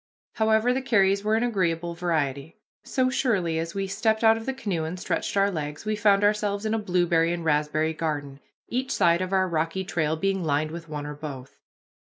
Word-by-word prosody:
However, 220 +2 +2
the 265 - -1
carries 200 -5 +2
were 215 +1 +2
an 225 - +1
agreeable 175 -7 0
variety. 160 -4 -2 0.3
So 255 -1 0
surely 190 -12 0
as 165 +2 -4
we 195 0 -1
stepped 220 +3 0
out 225 0 +6
of 225 +2 -7
the - - +1
canoe 195 -11 -2
and 170 +3 -5
stretched 190 - -2
our 200 0 +3
legs 150 0 -5
we 215 0 0
found 205 -1 +3
ourselves 205 0 +1
in 215 - 0
a 225 - +1
blueberry 175 -4 +2
and 170 -1 -3
raspberry 155 +1 +1
garden, 145 -4 -4 0.3
each 260 +2 -2
side 170 -5 +3
of 185 0 -3
our 190 -1 +2
rocky 165 +2 -1
trail 160 -4 -1
being 195 +2 -1
lined 155 0 0
with 165 -1 -8
one 150 -1 -5
or 150 - -5
both. 140 -3 -9
180 Hz, 205 wpm, -26 LUFS, 160-210 Hz, 0.3 s, out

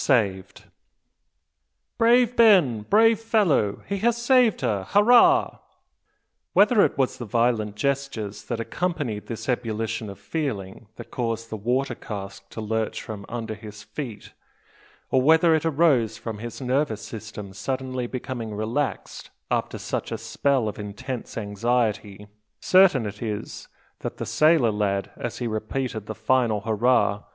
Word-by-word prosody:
SAVED! 100 -8 0 1.4
"Brave 240 +1 +4
Ben! 185 - +5
brave 220 - +4
fellow! 200 - +1
he 200 0 -3
has 235 +3 +2
saved 240 -2 +3
her! 105 -7 0
Hurrah!" 245 - +5 0.9
Whether 210 +1 +5
it - - 0
was 135 -2 0
the 120 - -5
violent 115 -2 0
gestures 115 -6 -3
that 120 +1 -3
accompanied 125 - -3
this 115 - -6
ebullition 110 -3 -2
of 100 - -9
feeling 115 - -4
that - - -11
caused 115 -2 -3
the - - -3
water 125 +5 -1
cask 100 -3 -8
to 110 - -7
lurch 110 0 -2
from 105 -2 -8
under 115 -2 -4
his 105 -1 -10
feet, 120 -6 -8 0.8
or 130 - +4
whether 160 +4 +5
it 160 0 +1
arose 135 -9 +2
from 110 -1 -6
his 120 +1 -7
nervous 130 -4 0
system 105 -3 -8
suddenly 130 +3 -3
becoming 120 -4 -5
relaxed 115 +3 -3 0.2
after - - -1
such - - -4
a 115 - -2
spell 120 +2 0
of 105 - -5
intense 105 +5 -6
anxiety, 105 -1 -1 0.3
certain 185 - +5
it 105 0 -7
is 105 -3 -5 0.3
that - - -5
the - - -4
sailor 155 -7 +4
lad, 100 -2 -1
as 120 - -5
he 120 - -3
repeated 110 0 -3
the 110 - -5
final 110 -1 +1
"Hurrah!" 110 -1 +1
115 Hz, 140 wpm, -24 LUFS, 105-140 Hz, 1.4 s, Ben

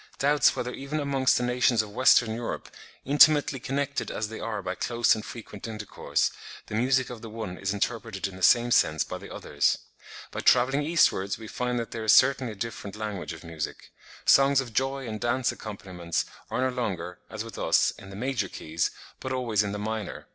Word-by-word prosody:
"doubts 145 +1 +4
whether 125 +1 -3
even 140 +3 -4
amongst 140 -2 +2
the 125 - -1
nations 125 -2 +3
of 105 - -10
Western 120 -2 +5
Europe, 115 +1 -5 0.4
intimately 145 0 +5
connected 140 +3 -2
as 110 -1 -3
they 110 - -7
are 105 -3 -4
by - - -2
close 120 -1 +2
and 110 - -4
frequent 110 -3 -8
intercourse, 110 -2 -1 0.3
the - - -10
music 130 +4 +2
of 120 -3 -8
the 115 - -8
one 110 -4 -5
is 95 +1 -2
interpreted 105 -1 -2
in 95 - -10
the 95 - -11
same 120 +5 +5
sense 80 -8 +3
by - - -6
the - - -11
others. 70 0 0 0.5
By - - -5
travelling 130 +3 +4
eastwards 145 - +2
we 110 - -9
find 125 +2 -2
that 115 -1 -3
there 115 - -4
is 110 - +5
certainly 130 -3 +4
a - - -12
different 105 -2 -6
language 105 -4 -4
of - - -11
music. 80 -3 -6 0.3
Songs 135 0 +6
of 125 -4 -4
joy 135 +1 -1
and 110 -1 -5
dance 120 +1 +1
accompaniments 90 -5 -4 0.2
are - - -1
no 130 - -4
longer, 90 -8 -3
as 110 0 -5
with 115 - -9
us, - - +3
in 95 - -12
the 95 - -9
major 120 -3 -2
keys, 80 +2 -2 0.3
but 130 - -5
always 120 -5 +1
in 105 -1 -2
the 105 - -3
minor." 110 -1 -4
115 Hz, 200 wpm, -27 LUFS, 105-130 Hz, 0.5 s, Songs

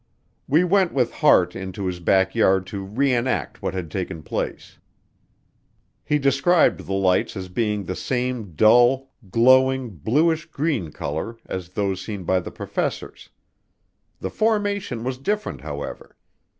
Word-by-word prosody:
We 155 +6 +4
went 185 0 +2
with 125 -3 +2
Hart 90 - +4
into 95 +1 -5
his 90 -1 -3
back 95 +2 +2
yard 95 -4 +3
to 100 - -3
re 125 +8 0
enact 125 +2 -1
what - - -3
had 85 -4 -5
taken 85 -4 -4
place. - - -5 1.2
He 150 - +1
described 140 +5 +2
the 95 - -2
lights 95 +1 +1
as 95 -1 -6
being 105 +1 -1
the 95 0 -4
same 125 0 -3
dull, 120 - +4 0.2
glowing 130 +3 +4
bluish 155 - +1
green 140 - -2
color 80 +14 -4
as 90 -2 -5
those 95 0 -2
seen 100 -4 -6
by 95 +2 +2
the 85 - -7
professors. - - -4 0.9
The - - -4
formation 205 - 0
was 130 0 -3
different, 210 +9 -2
however. 75 -2 -7
115 Hz, 140 wpm, -23 LUFS, 95-135 Hz, 1.2 s, We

